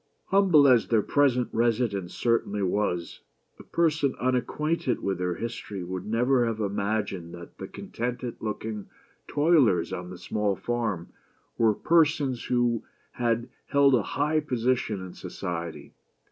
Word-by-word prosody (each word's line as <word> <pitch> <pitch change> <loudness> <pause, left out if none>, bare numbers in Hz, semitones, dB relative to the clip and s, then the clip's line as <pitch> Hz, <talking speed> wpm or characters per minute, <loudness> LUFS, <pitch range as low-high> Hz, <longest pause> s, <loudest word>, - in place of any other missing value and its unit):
H - - -10
umble 180 -8 +6
as 125 -3 +5
their 110 -3 +3
present 130 -4 +2
residence 115 -5 0
certainly 110 -4 0
was, 90 -3 -1 0.4
a - - -10
person 155 -5 +1
unacquainted 130 +3 0
with 95 -2 -1
their 90 -1 -1
history 115 -4 -5
would 90 +2 -5
never 125 +3 +2
have 115 -1 -2
imagined 100 -4 -2
that 85 0 -12
the - - -5
contented 120 0 -5
looking 110 -1 -4 0.4
toilers 145 - +3
on 90 0 -5
the 90 - -8
small 100 +2 -1
farm 110 -7 -2 0.5
were 110 -2 +3
persons 145 -6 +2
who 120 -2 +1 0.3
had 120 -1 0 0.2
held 140 -1 +4
a 120 - +4
high 150 +8 0
position 125 -8 -1
in 90 - -9
society. 85 -4 -6
115 Hz, 135 wpm, -27 LUFS, 100-130 Hz, 0.5 s, umble